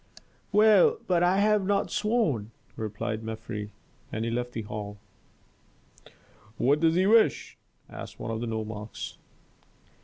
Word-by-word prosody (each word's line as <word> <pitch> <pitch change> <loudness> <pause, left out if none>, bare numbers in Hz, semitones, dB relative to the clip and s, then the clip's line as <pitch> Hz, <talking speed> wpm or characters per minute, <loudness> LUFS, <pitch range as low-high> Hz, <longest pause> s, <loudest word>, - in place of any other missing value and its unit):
"Well, 220 - +6
but 175 -2 +2
I 180 +2 +3
have 210 0 +3
not 200 +1 0
sworn," 185 - 0 0.3
replied 110 0 -4
Mefres, 110 -2 -5 0.4
and 110 +1 -2
he 115 - -1
left 120 +1 -2
the 115 - -4
hall. 105 -1 -6 1.6
"What 145 +4 +3
does 165 0 +3
he 185 +1 +3
wish?" 220 +2 +3 0.3
asked - - -9
one - - -4
of 110 0 -3
the 120 - -3
nomarchs. 110 -1 -5
120 Hz, 130 wpm, -27 LUFS, -, 1.6 s, Well